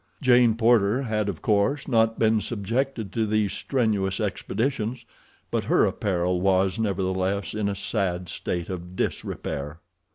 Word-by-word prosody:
Jane 120 Hz, -4 st, +5 dB
Porter 115 Hz, +1 st, +3 dB
had 110 Hz, -4 st, -1 dB
of 90 Hz, -, -6 dB
course 110 Hz, +7 st, +1 dB
not 115 Hz, -3 st, +2 dB
been 110 Hz, -1 st, +3 dB
subjected 115 Hz, 0 st, -2 dB
to 110 Hz, -2 st, 0 dB
these 105 Hz, -2 st, +1 dB
strenuous 105 Hz, -8 st, 0 dB
expeditions, 115 Hz, +3 st, -2 dB, 0.5 s
but -, -, -1 dB
her -, -, +4 dB
apparel 90 Hz, -2 st, 0 dB
was, 95 Hz, +2 st, +2 dB
nevertheless, 95 Hz, -1 st, -1 dB
in 105 Hz, -1 st, -1 dB
a 100 Hz, -, -2 dB
sad 90 Hz, -2 st, -2 dB
state 85 Hz, 0 st, -4 dB
of 90 Hz, 0 st, -7 dB
disrepair. 75 Hz, -3 st, -3 dB
105 Hz, 135 wpm, -25 LUFS, 95-115 Hz, 0.5 s, Jane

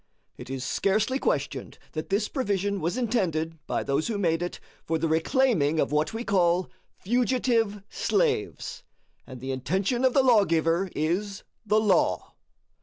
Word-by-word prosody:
It -, -, -10 dB
is 135 Hz, -1 st, -4 dB
scarcely 215 Hz, -, +1 dB
questioned -, -, -2 dB
that 155 Hz, 0 st, -5 dB
this 205 Hz, +2 st, +1 dB
provision 200 Hz, -, -1 dB
was 170 Hz, +9 st, -1 dB
intended 165 Hz, -10 st, -1 dB
by -, -, -1 dB
those 140 Hz, +3 st, 0 dB
who 225 Hz, -3 st, -2 dB
made 165 Hz, -4 st, +1 dB
it 175 Hz, -, -4 dB, 0.2 s
for 165 Hz, -, -1 dB
the 165 Hz, +1 st, 0 dB
reclaiming 160 Hz, -, +2 dB
of -, -, +1 dB
what 150 Hz, +1 st, +1 dB
we 225 Hz, +1 st, -4 dB
call 180 Hz, -3 st, +2 dB, 0.3 s
fugitive 230 Hz, -2 st, +1 dB
slaves; 445 Hz, -, -1 dB, 0.5 s
and 130 Hz, -2 st, -9 dB
the 130 Hz, +2 st, -4 dB
intention 190 Hz, -, -1 dB
of 260 Hz, -1 st, +4 dB
the 270 Hz, -, +5 dB
lawgiver 185 Hz, -6 st, +3 dB
is 190 Hz, +6 st, -1 dB, 0.2 s
the 215 Hz, +1 st, +4 dB
law. 200 Hz, -5 st, +1 dB
195 Hz, 150 wpm, -26 LUFS, 160-230 Hz, 0.5 s, the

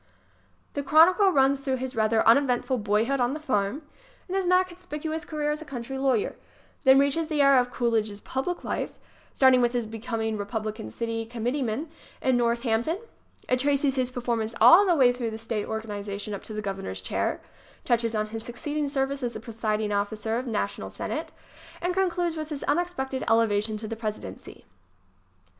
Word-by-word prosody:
The 285 Hz, -, -2 dB
chronicle 335 Hz, +8 st, +6 dB
runs 275 Hz, -2 st, +3 dB
through 270 Hz, -1 st, -1 dB
his 260 Hz, 0 st, -5 dB
rather 220 Hz, 0 st, +2 dB
uneventful 255 Hz, +1 st, +3 dB
boyhood 220 Hz, +6 st, +1 dB
on 245 Hz, +3 st, +1 dB
the -, -, -5 dB
farm 255 Hz, -1 st, -1 dB, 0.4 s
and 375 Hz, -, -3 dB
his 385 Hz, -2 st, 0 dB
not 365 Hz, +1 st, +4 dB
conspicuous 320 Hz, -3 st, -5 dB
career 300 Hz, -1 st, -1 dB
as 300 Hz, +1 st, -3 dB
a -, -, -5 dB
country 265 Hz, -1 st, -5 dB
lawyer; 260 Hz, -6 st, +1 dB, 0.5 s
then 265 Hz, 0 st, +8 dB
reaches 280 Hz, +4 st, +2 dB
the 300 Hz, -3 st, +2 dB
era 275 Hz, -2 st, +6 dB
of 245 Hz, -, -4 dB
Cool 240 Hz, -1 st, 0 dB
idge's 215 Hz, -2 st, 0 dB
public 270 Hz, +11 st, -3 dB
life -, -, -3 dB
ŌĆö -, -, -29 dB, 0.4 s
starting 260 Hz, -2 st, +6 dB
with 240 Hz, 0 st, +2 dB
his 240 Hz, -2 st, 0 dB
becoming 225 Hz, 0 st, -3 dB
Re 205 Hz, -, -3 dB
publican 215 Hz, +1 st, -4 dB
city 230 Hz, -1 st, -3 dB
committeeman 245 Hz, +4 st, -2 dB, 0.3 s
in 260 Hz, -1 st, +2 dB
Northampton. 235 Hz, +5 st, +1 dB, 0.5 s
It 255 Hz, -, +2 dB
traces 280 Hz, 0 st, +2 dB
his 255 Hz, -2 st, 0 dB
performance 235 Hz, -3 st, -2 dB
all 390 Hz, +4 st, +8 dB
the 350 Hz, -, +4 dB
way 255 Hz, -4 st, +5 dB
through 245 Hz, -2 st, -3 dB
the 220 Hz, -, -6 dB
state 225 Hz, -2 st, -3 dB
organization 210 Hz, -2 st, -5 dB
up 200 Hz, -, -5 dB
to 220 Hz, -, -8 dB
the 215 Hz, -, -4 dB
Governor's 195 Hz, -, -4 dB
chair, 95 Hz, -, -1 dB, 0.5 s
touches 230 Hz, -1 st, +1 dB
on 215 Hz, 0 st, -1 dB
his 225 Hz, +1 st, -5 dB
succeeding 290 Hz, +6 st, -3 dB
service 275 Hz, 0 st, -1 dB
as 240 Hz, -2 st, -3 dB
presiding 215 Hz, -1 st, -2 dB
officer 210 Hz, +2 st, -1 dB
of 255 Hz, -, -5 dB
the 240 Hz, -, -4 dB
National 205 Hz, -2 st, -2 dB
Senate -, -, -4 dB
ŌĆö -, -, -21 dB
and 360 Hz, +1 st, +1 dB
concludes 350 Hz, -3 st, 0 dB
with 310 Hz, 0 st, -4 dB
his 295 Hz, -3 st, -5 dB
unex 350 Hz, +4 st, +1 dB
pected 265 Hz, 0 st, -3 dB
elevation 220 Hz, -1 st, +2 dB
to 215 Hz, +1 st, -6 dB
the 225 Hz, -, -4 dB
Presidency. 215 Hz, -, -7 dB
245 Hz, 185 wpm, -26 LUFS, 220-285 Hz, 0.5 s, then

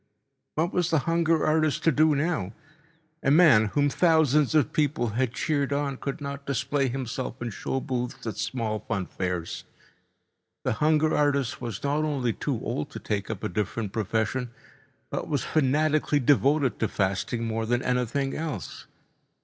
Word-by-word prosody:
What 165 Hz, +4 st, 0 dB
was 175 Hz, -2 st, +1 dB
the 160 Hz, -, +3 dB
hunger 165 Hz, -1 st, +2 dB
artist 155 Hz, -1 st, +1 dB
to 165 Hz, -, +5 dB
do 155 Hz, +1 st, +4 dB
now? 140 Hz, -, -1 dB, 0.7 s
A -, -, +1 dB
man 145 Hz, -8 st, +6 dB
whom 145 Hz, +7 st, +1 dB
thousands 155 Hz, -2 st, +3 dB
of 150 Hz, -4 st, +3 dB
people 140 Hz, -6 st, +1 dB
had 120 Hz, +3 st, 0 dB
cheered 145 Hz, -1 st, 0 dB
on 140 Hz, -1 st, -1 dB
could 140 Hz, +4 st, -4 dB
not 140 Hz, -1 st, -6 dB
display 140 Hz, +1 st, 0 dB
himself 130 Hz, 0 st, -4 dB
in 120 Hz, -1 st, -4 dB
show 135 Hz, -, -3 dB
booths 125 Hz, -2 st, -4 dB
at 110 Hz, -, -3 dB
small 115 Hz, -2 st, -2 dB
fun 100 Hz, -5 st, -3 dB
fairs. 90 Hz, -3 st, -4 dB, 1.0 s
The -, -, +1 dB
hunger 155 Hz, 0 st, +3 dB
artist 140 Hz, -4 st, +1 dB
was 120 Hz, -3 st, -5 dB
not 145 Hz, +2 st, +1 dB
only 135 Hz, -6 st, 0 dB
too -, -, -2 dB
old -, -, -3 dB
to -, -, -6 dB
take 100 Hz, -2 st, -3 dB
up 110 Hz, -4 st, -5 dB
a -, -, +1 dB
different 105 Hz, +2 st, -3 dB
profession, 115 Hz, +4 st, -1 dB, 0.6 s
but -, -, -3 dB
was 145 Hz, -5 st, 0 dB
fanatically 150 Hz, +1 st, +2 dB
devoted 140 Hz, 0 st, +3 dB
to 110 Hz, -, +1 dB
fasting 100 Hz, +4 st, -1 dB
more 110 Hz, 0 st, -2 dB
than 120 Hz, +2 st, +1 dB
anything 125 Hz, +2 st, 0 dB
else. 150 Hz, -, -5 dB
135 Hz, 160 wpm, -26 LUFS, 115-150 Hz, 1.0 s, man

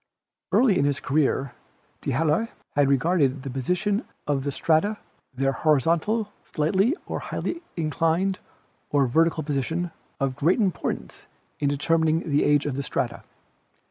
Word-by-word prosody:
Early 235 Hz, -, +4 dB
in 140 Hz, -, +3 dB
his 145 Hz, -1 st, +1 dB
career 140 Hz, -2 st, +1 dB, 0.5 s
D'Halloy 165 Hz, +8 st, +1 dB, 0.3 s
had 140 Hz, -1 st, +4 dB
regarded 140 Hz, -1 st, +2 dB
the 135 Hz, -, -5 dB
position 180 Hz, -, 0 dB, 0.2 s
of 140 Hz, -2 st, 0 dB
the 140 Hz, -, -1 dB
strata, 165 Hz, +9 st, +1 dB, 0.3 s
their 135 Hz, +1 st, 0 dB
horizontal, 165 Hz, -, +1 dB
slightly 190 Hz, -, +1 dB
or -, -, -3 dB
highly 335 Hz, -, -4 dB, 0.2 s
inclined, 165 Hz, +4 st, +1 dB, 0.5 s
or 145 Hz, -2 st, +3 dB
vertical 160 Hz, +5 st, +2 dB
position, 160 Hz, +5 st, -2 dB, 0.3 s
of 135 Hz, -2 st, 0 dB
great 165 Hz, -, +2 dB
importance 195 Hz, -5 st, -2 dB, 0.3 s
in 145 Hz, -, +1 dB
determining 160 Hz, +3 st, +1 dB
the 145 Hz, -, +3 dB
age 145 Hz, 0 st, +3 dB
of 145 Hz, -3 st, -2 dB
the -, -, 0 dB
strata. 135 Hz, -, -2 dB
155 Hz, 135 wpm, -25 LUFS, 140-175 Hz, 0.5 s, Early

